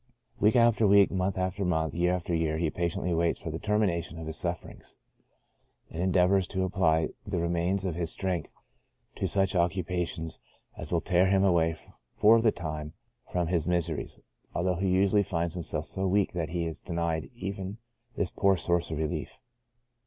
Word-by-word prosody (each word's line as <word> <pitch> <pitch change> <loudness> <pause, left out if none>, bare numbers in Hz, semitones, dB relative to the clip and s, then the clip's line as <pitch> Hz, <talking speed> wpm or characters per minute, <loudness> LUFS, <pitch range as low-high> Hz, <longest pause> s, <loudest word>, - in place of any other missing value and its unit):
Week 105 +4 +4
after 115 -2 +4
week, 100 0 +6
month 95 0 -1
after 95 +2 -1
month, 80 -5 0
year 90 +1 +1
after 90 -1 -2
year, 80 -1 0
he 80 -1 0
patiently 85 0 -1
waits 85 0 +1
for 80 - -5
the 80 - -4
termination 100 -6 0
of 80 - -6
his 80 0 -4
sufferings, 85 0 -4 0.9
and 85 - -4
endeavors 95 0 +3
to 95 0 -2
apply 85 -4 +2 0.2
the 100 -3 -2
remains 85 +3 0
of 90 - -1
his 85 0 -2
strength 90 -4 -2 0.7
to - - 0
such 95 -1 +1
occupations 85 -1 -1 0.4
as 80 - -8
will 85 -2 +1
tear 90 0 +3
him 95 0 +3
away 85 -4 +3 0.4
for 110 +2 +6
the 110 -1 +4
time 75 -3 -5 0.4
from 90 -1 0
his 85 -1 0
miseries, 85 -3 -1 0.4
although 90 0 0
usually 95 +2 +3
he 100 - -5
finds 85 -1 -1
himself 80 -3 -3
so 95 +2 -1
weak 100 +1 +1
that 85 -3 -2
he 85 0 -2
is 80 -1 -4
denied 85 -2 -2
even 95 -1 -5 0.4
this 90 - -1
poor 100 -2 +3
source 85 0 +1
of 80 - -3
relief. 80 -1 -3
90 Hz, 175 wpm, -28 LUFS, 85-95 Hz, 0.9 s, week